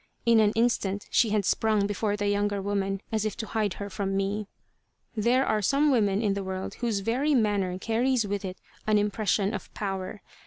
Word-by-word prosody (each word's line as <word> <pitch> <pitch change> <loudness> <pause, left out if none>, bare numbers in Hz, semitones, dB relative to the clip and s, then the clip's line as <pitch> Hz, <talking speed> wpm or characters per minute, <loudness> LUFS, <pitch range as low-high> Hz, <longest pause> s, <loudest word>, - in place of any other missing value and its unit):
In 230 -1 +5
an 210 -1 +4
instant 210 -4 +1
she 230 - +4
had 210 -2 +1
sprung 215 -1 +2
before 205 +1 -1
the 205 0 -1
younger 205 0 +1
woman, 195 -1 -1
as 220 -2 0
if 215 +1 -3
to 230 - -3
hide 215 -3 -1
her 200 - -5
from 195 -1 -2
me. 200 +1 -1 0.7
There 240 +5 +2
are 215 - +1
some 280 +8 +3
women 205 -4 +2
in 205 -2 +2
the 200 0 -3
world 190 0 -4
whose 225 -4 0
very 265 +8 +1
manner 205 -6 +1
carries 230 +3 +1
with 205 0 -3
it 185 -1 -5 0.3
an 215 -1 +4
impression 205 0 +1
of 205 - -6
power. 195 0 -4
205 Hz, 195 wpm, -27 LUFS, 195-225 Hz, 0.7 s, In